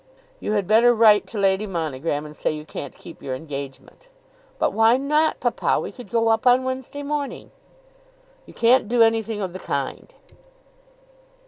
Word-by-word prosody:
"You 210 - -3
had 205 -3 0
better 235 +4 +5
write 215 -2 +5
to 225 - -8
Lady 195 +1 +1
Monogram 155 -4 -3
and 150 0 -10
say - - -1
you 155 0 -7
can't 140 -3 -8
keep 170 - -13
your 130 -2 -4
engagement." 140 - -9 0.5
"But - - 0
why 225 +3 +4
not, 300 +3 +1
papa? - - 0
We - - -5
could 245 -6 -12
go 230 -1 +1
up 225 +3 +1
on 250 +1 +5
Wednesday 260 +2 -5
morning." 285 -1 -4 1.0
"You - - -13
can't 235 0 +4
do 240 -1 +4
anything 225 -1 0
of 185 -2 -5
the 185 - -7
kind." 140 -6 -4
220 Hz, 165 wpm, -22 LUFS, 165-245 Hz, 1.0 s, better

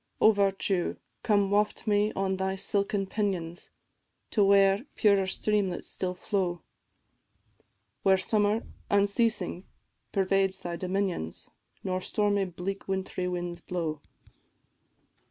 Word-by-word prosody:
O 220 - +7
Virtue, 195 -3 +1 0.3
come 205 -3 +2
waft 210 +1 +1
me 210 0 +2
on 190 0 0
thy 190 0 -1
silken 200 +1 0
pinions, 185 -4 -2 0.6
To 210 - +3
where 195 +4 +4
purer 200 -3 +4
streamlets 195 -2 0
still 180 -1 -3
flow, 180 -2 -2 1.4
Where 190 -1 +5
summer, 210 +3 +1 0.3
unceasing, 200 -2 +1 0.5
pervades 195 0 +1
thy 175 -1 -4
dominions, 185 - -2 0.3
Nor 185 -1 -1
stormy 205 +1 +1
bleak 185 +2 -5
wint'ry 190 -1 -2
winds 175 -1 -4
blow. 160 -4 -3
195 Hz, 105 wpm, -28 LUFS, 180-205 Hz, 1.4 s, O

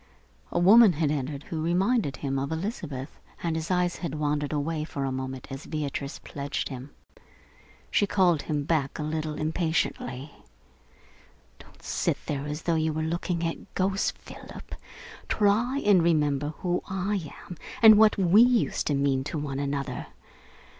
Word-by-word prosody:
A - - -1
woman 205 +3 +7
had 150 -1 0
entered 140 0 -3
who 160 -2 -4
reminded 180 - +1
him 135 -1 -2
of 140 +2 -3
Elizabeth, 160 - -5 0.2
and 165 -2 0
his 160 0 -3
eyes 180 -1 +1
had 165 -5 -4
wandered 150 -1 -1
away 150 +1 -1
for 140 -3 -4
a 135 - -1
moment 130 0 -5
as 135 +2 -7
Beatrice 145 -2 -3
pledged 140 0 -4
him. 130 0 -7 1.0
She 205 - +3
called 180 -6 +3
him 150 -2 -2
back 140 -3 0
a 150 - -3
little 155 0 -2
impatiently. 155 -4 -2 1.3
"Don't - - -18
sit - - 0
there 145 0 -3
as 150 +2 -5
though 170 - +1
you 160 0 +1
were 155 +1 -2
looking 170 +1 -2
at 165 - -5
ghosts, 195 +1 +1
Philip! - - -11 0.6
Try 220 +6 +2
and 200 -4 +6
remember 150 -3 +1
who 180 -1 0
I 190 -3 -2 0.2
am 180 - -7 0.3
and 220 -1 +11
what 215 0 +5
we 195 +3 +5
used 245 -1 +3
to 145 - +2
mean 140 -1 +1
to 155 - -4
one 140 -2 -3
another. 140 -1 -3
155 Hz, 160 wpm, -27 LUFS, 145-180 Hz, 1.3 s, and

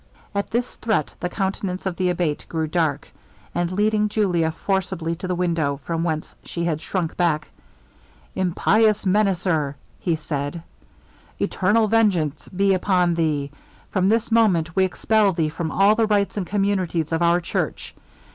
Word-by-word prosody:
At 200 0 -2
this 240 +2 -1
threat 220 -10 0
the 180 - -2
countenance 190 -1 -3
of 190 -2 -1
the 185 0 0
Abate 170 -4 -1
grew 160 -1 -1
dark: 155 -3 -1 0.4
and 175 0 -1
leading 210 +2 +2
Julia 180 -7 +1
forcibly 185 -1 -2
to 185 - -5
the 180 - -1
window, 165 -6 0
from 165 +3 -2
which 155 -2 -1 0.2
she 170 - -4
had 155 -3 -1
shrunk 175 -3 -2
back, 160 -4 0 0.8
'Impious 210 +4 +2
menacer!' 180 -7 +1 0.4
said 150 +1 -4 0.7
he, - - -2
'eternal 215 +4 +2
vengeance 190 -9 +1
be 195 +1 +2
upon 180 -2 +2
thee! 150 -4 0 0.4
From 190 -1 +2
this 225 +1 +1
moment 180 -8 +3
we 190 - +4
expel 205 +2 +2
thee 160 -2 0
from 160 +1 -3
all 195 +6 +4
the 220 0 +2
rights 205 -2 +1
and 195 -4 -3
communities 190 -6 0
of 165 +1 0
our 170 +1 +4
church. 170 - -3
180 Hz, 155 wpm, -23 LUFS, 165-200 Hz, 0.8 s, we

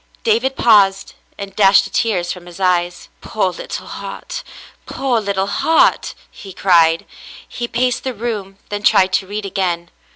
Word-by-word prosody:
David 235 +4 +1
paused 200 -4 +3 0.2
and 200 -1 -8
dashed 195 -1 +5
the 195 - -9
tears 180 -7 0
from 175 -1 -9
his 175 +1 -12
eyes. 175 -2 0
"Poor 200 -4 -1
little 175 - -7
heart! - - -7 0.4
Poor 260 -4 -1
little 200 -2 -1
heart!" 320 +10 +2 0.2
he 195 -2 -11
cried. 165 -3 +3 0.4
He 240 - -5
paced 245 +1 -1
the 260 -2 -4
room, 205 -4 -5
then 205 0 -4
tried 190 -2 +3
to 190 - +1
read 205 +1 -5
again. 175 -3 -2
195 Hz, 155 wpm, -18 LUFS, 185-225 Hz, 0.4 s, dashed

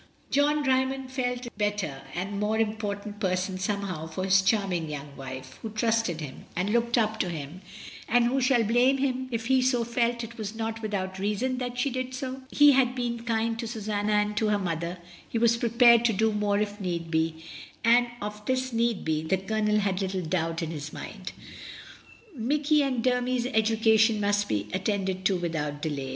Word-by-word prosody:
John 295 +1 +3
Dymond 260 0 0
felt 250 -1 -2
a 240 - -7
better 205 -10 -1
and 200 +3 -3
more 210 +1 0
important 210 -1 -2
person 185 0 -1
somehow 190 -5 -2
for 160 +4 -4
his 190 0 +5
charming 190 -5 0
young 145 -1 -7
wife, 130 -1 -8
who 225 - -4
trusted 220 -6 0
him, 145 -3 -8
and 185 +4 0
looked 235 +1 +2
up 220 -1 +1
to 180 - 0
him 160 +2 -6 0.2
— - - -13
and 240 0 +4
who 265 +3 +1
shall 250 -2 +3
blame 245 +5 +3
him 260 -1 -1
if 230 -2 -3
he 265 +2 +3
also 255 -2 +2
felt 235 0 0
it 230 +1 -9
was 215 0 -4
not 225 0 -3
without 190 -3 -3
reason 210 +6 -1
that 245 -1 -4
she 260 +2 0
did 255 0 -3
so? 260 0 -5
He 290 0 +7
had 255 -2 +3
been 235 -2 -3
kind 230 0 0
to 230 - -3
Susanna 215 -2 -2
and 210 0 +1
to 220 - +2
her 210 -1 +2
mother; 170 -2 -3 0.3
he - - -2
was 230 0 +4
prepared 235 0 +5
to 230 - +3
do 220 +3 +2
more 210 -1 +1
if 205 0 -2
need 170 -3 -3
be; 160 0 0 0.4
and 240 +1 +5 0.2
of 210 0 -6
this 260 -1 0
need 230 -2 0
be, 155 -1 0
the 160 +4 0
Colonel 210 +2 0
had 195 -1 0
little 190 -1 -2
doubt 165 0 -1
in 165 - -3
his 150 -1 -6
mind. - - -7 1.0
Mikey 290 +5 +2
and 260 -4 0
Dermy's 250 -1 +1
education 220 -2 +3
must 205 0 +1
be 105 -1 -1
attended 190 -1 -1
to 190 -1 +3
without 155 -4 -3
delay. 145 -4 -3
215 Hz, 195 wpm, -27 LUFS, 185-240 Hz, 1.0 s, He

